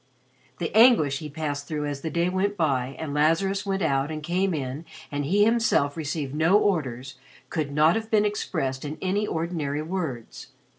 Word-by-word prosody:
The 170 +3 -4
anguish 220 - +5
he 155 - -7
passed 145 -1 -4
through 150 -2 -3
as 145 -1 -4
the 160 - -3
day 170 +3 0
went 195 +3 -1
by 135 -5 0
and 150 -3 -5
Lazarus 190 +7 +1
went 195 -1 -1
out 140 -2 +1
and 155 -1 -5
came 185 +4 0
in 140 -1 -4 0.3
and 145 0 -2
he 200 +7 +3
himself 225 -11 +2
received 150 -3 -3
no 165 +6 +4
orders, 135 - -1 0.3
could 155 -4 -2
not 155 +3 +4
have 225 0 -3
been 210 -1 +3
expressed 160 -10 -2
in 150 +1 -5
any 200 +3 0
ordinary 160 -3 -2
words. 155 -9 -5
155 Hz, 180 wpm, -25 LUFS, 145-190 Hz, 0.3 s, anguish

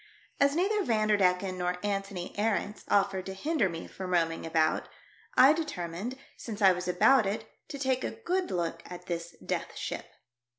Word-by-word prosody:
As 280 +1 +4
neither 400 +4 +2
Vanderdecken 200 - +2
nor 180 0 0
Antony 195 -3 -3
Arents 210 0 -1
offered 195 -2 +2
to 190 - -5
hinder 285 - +1
me 165 -1 -6
from 185 -1 -7
roaming 165 -1 +1
about, 160 -1 +1 0.5
I 270 +3 +8
determined, 230 - -4 0.2
since 220 -3 -7
I 195 -3 +7
was 180 0 -3
about 220 +5 +5
it, 220 +2 -3 0.2
to 285 - -6
take 260 -2 0
a - - -1
good 375 -5 -2
look 170 -1 -2
at 180 0 -9
this 170 0 -4
Death - - -3
Ship. - - -4
195 Hz, 165 wpm, -29 LUFS, 180-260 Hz, 0.5 s, I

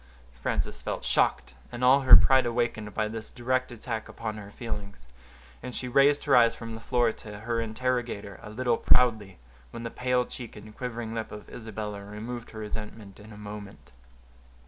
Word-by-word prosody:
Frances - - -1
felt - - -4
shocked, - - +2 0.2
and 120 0 -5
all 130 +2 +7
her 130 -2 +10
pride 130 -2 +6
awakened, 115 -3 -1
by 110 -1 +1
this 110 0 -5
direct 130 +1 -1
attack 115 -1 -5
upon 110 -2 -4
her 100 -1 -8
feelings, 100 - -6 0.6
and 125 -1 -6
she 125 - -3
raised 140 +4 +4
her 140 - +5
eyes 115 -1 +6
from 115 -1 -7
the 110 - -7
floor 120 -1 +2
to 105 -2 -10
her 115 +1 -1
interrogator 115 -3 -2
a - - -9
little 120 +1 +1
proudly, 110 -7 +3 0.3
when 115 - -7
the 115 - -4
pale 125 0 +1
cheek 120 -2 -8
and 105 +1 -11
quivering 120 -3 -4
lip 110 -1 -4
of 105 - -9
Isabella 105 -2 -6
removed 115 +4 -6
her 110 - -11
resentment 105 -1 -7
in 105 +1 -12
a 105 - -11
moment. 105 -4 -9
115 Hz, 180 wpm, -28 LUFS, 105-125 Hz, 0.6 s, her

